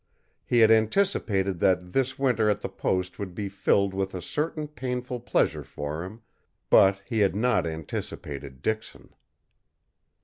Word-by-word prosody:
He 120 -1 +4
had 110 0 +7
anticipated 110 - +2
that 90 -1 +1
this 130 -1 0
winter 125 -5 +2
at 105 - 0
the - - -4
post 90 0 -2
would 95 -3 -5
be 100 0 -3
filled 100 0 +1
with 95 0 -2
a 90 - -4
certain 150 - -2
painful 125 -3 -4
pleasure 120 - 0
for 75 +3 -5
him 105 +6 -9 0.5
but 95 0 +5
he 115 -4 -2
had 100 -2 +3
not 125 -3 +2
anticipated 70 -3 -6
Dixon. 110 0 -4
100 Hz, 145 wpm, -26 LUFS, 90-125 Hz, 0.5 s, had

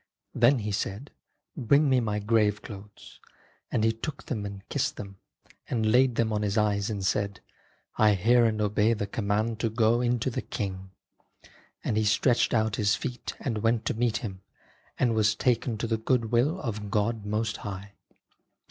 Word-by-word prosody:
Then 120 +4 +4
he 105 -2 -3
said, 100 +6 -3 0.2
' - - -54
Bring 140 +2 +3
me 130 -2 +4
my 105 -3 -1
grave 105 -1 +1
clothes,' 100 -1 -11 0.5
and 110 - +1
he 110 - +4
took 140 +6 -6
them 105 -5 -3
and 100 -1 -10
kissed - - -1
them, 100 -1 -8 0.5
and 110 -3 +1
laid 125 0 +4
them 110 -1 +1
on 105 - 0
his 105 +1 -1
eyes 105 -1 +1
and 100 -3 -3
said, 100 +1 -1 0.3
' - - -35 0.3
I 105 -1 +5
hear 120 +5 +4
and 110 -1 0
obey 105 +2 +2
the 105 - -2
command 105 +2 -1
to 115 - 0
go 115 +1 +2
into 120 +1 0
the - - -3
King.' 95 -3 -5 0.9
And 105 - -1
he 110 - +2
stretched 115 +3 +2
out 110 -2 +1
his 105 0 +2
feet 125 0 -5
and 115 -5 -2
went 115 +1 +1
to - - 0
meet 115 0 0
Him 95 -3 -7 0.6
and 120 -3 +2
was 110 -1 +2
taken 120 -1 0
to 110 - -2
the 115 0 0
good 115 0 0
will 140 +10 +2
of 105 - -4
God 105 +2 0
Most 110 +1 -2
High." 100 0 -7
110 Hz, 185 wpm, -27 LUFS, 105-115 Hz, 0.9 s, I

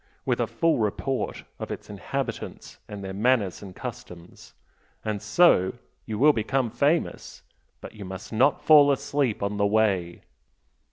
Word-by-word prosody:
with - - 0
a - - +1
full 165 -5 +1
report 120 +5 -2 0.2
of - - -5
its - - -7
inhabitants - - -5
and 105 -1 -8
their 95 0 -5
manners 105 -2 +1
and 95 -3 -10
customs. 85 0 -10 0.5
And 105 -2 -2
so 105 - +4 0.3
you 110 -2 -3
will 150 +5 +5
become 120 +1 -1
famous! 120 - -1 0.4
But - - -9
you 105 - -9
must 95 +3 -8
not 130 +6 +2
fall 145 -2 +7
asleep 140 -5 -1
on 100 +1 -2
the 100 0 +2
way!" 100 -5 0
110 Hz, 150 wpm, -25 LUFS, 100-135 Hz, 0.5 s, fall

